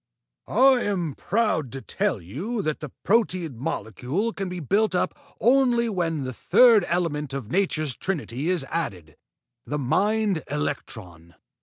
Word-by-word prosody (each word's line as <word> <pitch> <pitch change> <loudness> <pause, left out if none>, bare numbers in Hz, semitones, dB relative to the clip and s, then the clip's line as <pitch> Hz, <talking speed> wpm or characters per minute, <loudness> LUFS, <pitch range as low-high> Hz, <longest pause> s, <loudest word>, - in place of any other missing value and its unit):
"I 260 +2 +5
am 180 -9 -1
proud 180 - 0
to 135 - -6
tell 195 - -1
you 175 - -4
that 155 -2 -2
the 150 - -6 0.2
proteid 185 - +1
molecule 130 - -2
can 195 -1 -4
be 180 0 -5
built 200 +6 +1
up - - +1 0.3
only 240 -2 +3
when 165 -7 -1
the 130 0 -4
third 230 - +5
element 150 -5 -1
of 125 -4 -6
nature's 155 -8 0
trinity 155 -5 -3
is 180 -5 +1
added 95 - -4 0.5
the 150 - -3
mind 195 - +1
electron. 95 - -5
170 Hz, 140 wpm, -25 LUFS, 135-205 Hz, 0.5 s, I